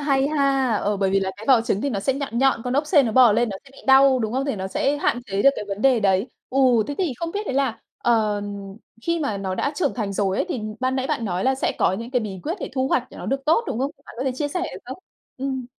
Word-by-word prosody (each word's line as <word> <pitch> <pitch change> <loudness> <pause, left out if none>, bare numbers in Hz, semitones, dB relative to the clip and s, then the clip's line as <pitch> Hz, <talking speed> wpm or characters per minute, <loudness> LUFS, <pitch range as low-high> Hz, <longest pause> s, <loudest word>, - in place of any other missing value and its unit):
hay 275 -1 +2
ha! 275 -5 +2
Ờ, 205 0 -1
bởi 195 -1 +1
vì 195 0 +2
là 190 0 -1
cái 215 - -10
vỏ 250 -4 +6
trứng 215 -3 -1
thì 280 - -1
nó 200 - -2
sẽ 270 - +1
nhọn 275 -4 -3
nhọn, 265 -3 +3
con 250 - -2
ốc 290 +2 +1
sên 290 -7 +4
nó 220 - -1
bò 245 -3 +7
lên, 235 +2 +2
nó 195 - -4
sẽ 275 - -17
bị - - -16
đau 265 -1 +6
đúng 220 -1 -2
không? 265 +2 0
Thì 275 -7 -2
nó 190 0 -3
sẽ 280 +8 0
hạn 245 -4 0
chế 195 0 -1
được 275 - +7
cái - - -4
vấn 200 +2 -4
đề 260 -4 +4
đấy. 195 +1 +2 0.2
Ừ, 270 - -1 0.3
thế 285 - -4
thì 345 -8 0
không 335 0 -4
biết 415 +1 -3
đấy 260 - -2
là, 270 -5 0 0.2
ờ, 215 -3 +1 0.6
khi 335 -1 0
mà 220 -9 -1
nó 190 -1 -3
đã 280 - -1
trưởng 290 -3 0
thành 210 -5 -3
rồi 195 -1 0
ấy - - 0
thì 255 -10 -3 0.2
ban 260 +1 0
nãy 260 0 -1
bạn 230 - -2
nói 185 -1 -2
là 265 0 +3
sẽ 265 - -1
có - - +3
những 230 +5 -5
cái 250 -2 +1
bí 195 -4 -6
quyết 330 +4 -2
để - - -5
thu 260 0 0
hoạch 255 - +1
để - - -12
nó - - -7
được 270 +1 -2
tốt, 330 +9 +3
đúng 225 - -3
không? 275 +2 -1 0.2
Bạn - - -11
có 260 - -2
thể 265 - +1
chia 290 +2 -2
sẻ 355 +5 -3
được 360 - -5
không? 260 +7 -8 0.4
Ừm. 260 -2 -3
255 Hz, 310 wpm, -23 LUFS, 210-275 Hz, 0.6 s, bò